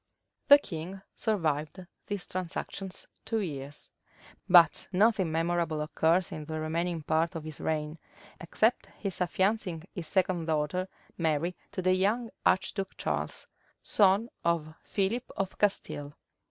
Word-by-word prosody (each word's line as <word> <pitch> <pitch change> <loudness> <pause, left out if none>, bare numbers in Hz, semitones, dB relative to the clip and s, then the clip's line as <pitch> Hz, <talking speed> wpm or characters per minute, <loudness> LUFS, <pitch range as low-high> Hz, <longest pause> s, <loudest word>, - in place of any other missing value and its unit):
The 285 0 +11
king 190 - -7
survived 165 -4 -1 0.2
these 205 -3 -3
transactions 185 +1 -4 0.2
two 225 - -1
years; 145 -5 -5 0.6
but 175 -3 +7
nothing 195 -3 +3
memorable 165 -1 0
occurs 165 +3 +2
in 155 - -6
the 155 +1 -4
remaining 165 +1 -1
part 165 +4 +1
of 160 - -4
his 155 -2 -7
reign, 155 0 -2 0.4
except 215 +7 +1
his 195 -3 -4
affiancing 185 -2 0
his 170 -3 -5
second 185 -3 +1
daughter, 160 +4 0 0.3
Mary, 165 +2 +1 0.2
to 185 - -3
the 185 0 +4
young 215 +5 +1 0.2
archduke 190 +1 0
Charles, - - -2 0.4
son 205 +3 +4
of 165 -2 0
Philip 215 +5 -1
of 195 -1 -2
Castile. 145 -8 0
175 Hz, 125 wpm, -30 LUFS, 160-195 Hz, 0.6 s, The